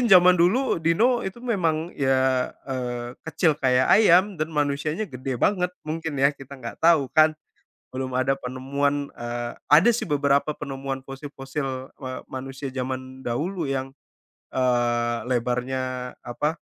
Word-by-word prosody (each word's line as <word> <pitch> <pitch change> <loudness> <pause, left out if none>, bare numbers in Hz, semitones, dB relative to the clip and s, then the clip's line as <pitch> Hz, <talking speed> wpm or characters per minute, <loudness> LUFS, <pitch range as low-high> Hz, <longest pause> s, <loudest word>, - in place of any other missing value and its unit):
Mungkin - - -1
zaman 180 -1 +8
dulu 195 +6 +3
dino 230 +10 +3
itu 190 +5 -6
memang, 170 -8 0
ya, 130 -1 +2 0.2
eee, 120 -2 -3 0.2
kecil 160 -1 +1
kayak 130 -2 +3
ayam, 195 -2 +5
dan 155 +1 -2
manusianya 150 +7 0
gede 130 0 -4
banget. 180 - +2 0.2
Mungkin, 160 0 -3
ya, 140 +1 +5
kita 135 0 -11
enggak 115 -2 -7
tahu, 160 -5 +4
kan. 155 0 +5 0.6
Belum 130 0 -4
ada 130 +1 +2
penemuan 140 +3 -1
eee, 120 0 -4 0.2
ada, 155 - +7
sih, 235 - -2
beberapa 145 0 +2
penemuan 135 -1 -5
fosil-fosil, 135 -1 -6
eee, 130 -1 -5
manusia 135 +1 -5
zaman 130 0 -5
dahulu 165 +9 -2
yang, 135 0 -2 0.6
eee, 120 -2 +1
lebarnya 125 +1 -1
apa 150 +6 -2
135 Hz, 135 wpm, -24 LUFS, 130-160 Hz, 0.6 s, zaman